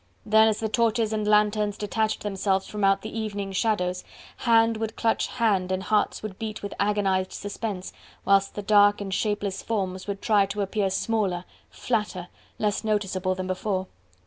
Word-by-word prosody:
Then 220 Hz, +1 st, +5 dB
as 220 Hz, -1 st, +1 dB
the 220 Hz, -, -1 dB
torches 225 Hz, -1 st, +1 dB
and 215 Hz, -1 st, -1 dB
lanthorns 210 Hz, -1 st, +2 dB
detached 215 Hz, +1 st, -1 dB
themselves 195 Hz, -1 st, 0 dB
from 210 Hz, -1 st, -5 dB
out 195 Hz, 0 st, +3 dB
the 220 Hz, -, -7 dB
evening 205 Hz, -3 st, -3 dB
shadows, 185 Hz, -3 st, 0 dB, 0.3 s
hand 230 Hz, -2 st, +3 dB
would 220 Hz, 0 st, -3 dB
clutch 225 Hz, -1 st, +1 dB
hand 205 Hz, -7 st, +1 dB
and 185 Hz, 0 st, -1 dB
hearts 210 Hz, +2 st, 0 dB
would 205 Hz, -3 st, -6 dB
beat 215 Hz, -2 st, -5 dB
with 200 Hz, -, -4 dB
agonized 195 Hz, -2 st, +1 dB
suspense, 205 Hz, -2 st, -5 dB, 0.3 s
whilst 195 Hz, 0 st, +3 dB
the 205 Hz, -, -4 dB
dark 205 Hz, 0 st, +5 dB
and 195 Hz, -2 st, -4 dB
shapeless 205 Hz, -1 st, -1 dB
forms 190 Hz, -4 st, -3 dB
would 200 Hz, -1 st, -3 dB
try 205 Hz, -3 st, +3 dB
to 200 Hz, +1 st, -3 dB
appear 200 Hz, 0 st, 0 dB
smaller, 190 Hz, -3 st, -1 dB, 0.2 s
flatter, 205 Hz, -6 st, -2 dB, 0.3 s
less 210 Hz, 0 st, 0 dB
noticeable 195 Hz, -3 st, 0 dB
than 185 Hz, 0 st, -4 dB
before. 185 Hz, 0 st, -2 dB
205 Hz, 170 wpm, -26 LUFS, 195-215 Hz, 0.3 s, Then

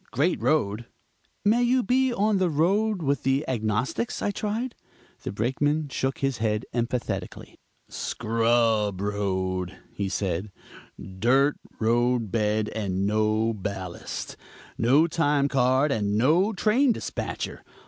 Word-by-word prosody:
Great 150 Hz, +9 st, 0 dB
road." 115 Hz, -7 st, +1 dB, 0.6 s
"May 230 Hz, +4 st, +4 dB, 0.2 s
be 260 Hz, +5 st, +2 dB
you 245 Hz, -, -1 dB
rode 195 Hz, 0 st, +2 dB
with 140 Hz, -2 st, +1 dB
the 135 Hz, +2 st, 0 dB
Agnostics?" 120 Hz, -, -1 dB
I 205 Hz, -, 0 dB
tried. 220 Hz, +5 st, -3 dB, 0.5 s
The -, -, -4 dB
Brakeman 145 Hz, +8 st, 0 dB
shook 135 Hz, 0 st, -2 dB
his 135 Hz, -4 st, -1 dB
head 105 Hz, +1 st, 0 dB
emphatically. 120 Hz, 0 st, -3 dB, 0.3 s
"Scrub 115 Hz, -3 st, +1 dB
road," 95 Hz, -3 st, -2 dB, 0.2 s
he 100 Hz, -1 st, -2 dB
said, 95 Hz, 0 st, -2 dB, 0.5 s
"dirt 125 Hz, +10 st, +2 dB, 0.2 s
road 120 Hz, -1 st, +1 dB
bed 105 Hz, -1 st, +1 dB
and 100 Hz, -3 st, -2 dB
no 110 Hz, +2 st, +1 dB
ballast; 95 Hz, -3 st, -6 dB, 0.4 s
no 135 Hz, +8 st, +4 dB
time 145 Hz, -4 st, +1 dB
card, 135 Hz, +1 st, +2 dB
and 105 Hz, -4 st, 0 dB
no 165 Hz, -, +3 dB
train 230 Hz, +6 st, +3 dB
dispatcher. -, -, -5 dB
120 Hz, 115 wpm, -26 LUFS, 105-155 Hz, 0.6 s, May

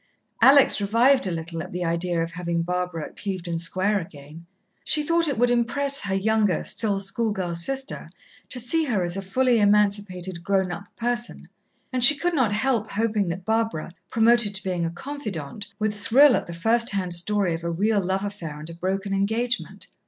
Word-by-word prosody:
Alex 275 Hz, -5 st, +6 dB
revived 230 Hz, +4 st, +3 dB
a -, -, -2 dB
little 165 Hz, 0 st, -5 dB
at -, -, -8 dB
the 180 Hz, 0 st, -3 dB
idea 170 Hz, 0 st, 0 dB
of 165 Hz, -, -6 dB
having 170 Hz, -1 st, -2 dB
Barbara 180 Hz, -2 st, -3 dB
at -, -, -13 dB
Clevedon 180 Hz, -4 st, -4 dB
Square 190 Hz, +5 st, 0 dB
again. 155 Hz, 0 st, -11 dB, 0.4 s
She 300 Hz, -, +2 dB
thought 335 Hz, +2 st, +1 dB
it 280 Hz, -5 st, -1 dB
would 245 Hz, +1 st, +3 dB
impress 275 Hz, +4 st, +1 dB
her 195 Hz, -1 st, -2 dB
younger, 210 Hz, 0 st, +1 dB
still 205 Hz, -3 st, 0 dB
schoolgirl 195 Hz, -3 st, -2 dB
sister 265 Hz, +11 st, -2 dB, 0.4 s
to 250 Hz, -, -4 dB
see 310 Hz, +7 st, 0 dB
her 215 Hz, -9 st, 0 dB
as 175 Hz, 0 st, -2 dB
a 195 Hz, -, -3 dB
fully 240 Hz, +5 st, +1 dB
emancipated 200 Hz, -4 st, +1 dB
grown 190 Hz, -1 st, 0 dB
up 175 Hz, +3 st, -6 dB
person, 240 Hz, 0 st, -3 dB, 0.5 s
and 255 Hz, -1 st, +2 dB
she 290 Hz, +4 st, +9 dB
could 350 Hz, +2 st, -1 dB
not 260 Hz, -9 st, +2 dB
help 220 Hz, 0 st, 0 dB
hoping 215 Hz, -2 st, 0 dB
that 180 Hz, +2 st, -5 dB
Barbara, 220 Hz, -7 st, -1 dB, 0.2 s
promoted 225 Hz, -2 st, +3 dB
to 195 Hz, -, -1 dB
being 180 Hz, -3 st, -1 dB
a -, -, -3 dB
confidante, 205 Hz, -, -7 dB
would 215 Hz, 0 st, -1 dB
thrill 245 Hz, +6 st, +5 dB
at -, -, -3 dB
the 170 Hz, -, -7 dB
first 230 Hz, +6 st, +2 dB
hand 185 Hz, -3 st, -1 dB
story 185 Hz, +1 st, 0 dB
of 165 Hz, +1 st, -5 dB
a 170 Hz, -, -2 dB
real 200 Hz, +4 st, +1 dB
love 190 Hz, +2 st, -1 dB
affair 170 Hz, -7 st, -6 dB
and 155 Hz, +2 st, -8 dB
a -, -, -9 dB
broken 195 Hz, +3 st, -3 dB
engagement. 220 Hz, +5 st, -2 dB
200 Hz, 190 wpm, -24 LUFS, 175-235 Hz, 0.5 s, she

